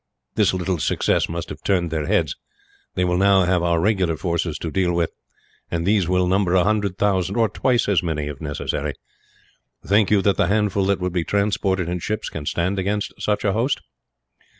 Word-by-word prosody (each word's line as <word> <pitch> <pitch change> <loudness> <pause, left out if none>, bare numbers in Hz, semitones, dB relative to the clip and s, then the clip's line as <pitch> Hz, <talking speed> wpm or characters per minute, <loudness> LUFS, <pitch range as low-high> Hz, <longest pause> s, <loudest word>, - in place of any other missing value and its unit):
This - - +3
little 90 -1 -2
success - - +1
must - - -5
have - - -8
turned 90 -4 0
their 80 -2 -2
heads. 90 -7 +1 0.6
They 90 - +1
will 90 0 +1
now 100 -1 +5
have 90 0 +2
our 85 -1 +1
regular 90 -4 +1
forces 85 -3 -2
to 80 - -5
deal 90 0 +1
with, 85 -1 0 0.6
and 85 0 -2
these 100 -3 +2
will 90 0 +2
number 95 0 +2
a 90 - +5
hundred 100 -2 0
thousand 95 -2 +1
or 115 -1 +3
twice 120 +3 +1
as 100 -5 +3
many, 80 -4 -2
if 75 -1 -7
necessary. 75 -2 -3 0.9
Think 100 +1 +3
you 100 -2 +3
that 100 0 +2
the - - +2
handful 100 -1 +1
that 100 -1 +1
would 90 -1 -2
be 90 -2 0
transported 100 -2 0
in 90 +1 -2
ships 105 +4 -3
can 75 -3 -7
stand 95 +3 0
against 100 +2 -2
such 105 0 0
a 100 - +2
host?" 120 +6 0
95 Hz, 195 wpm, -22 LUFS, 85-100 Hz, 0.9 s, now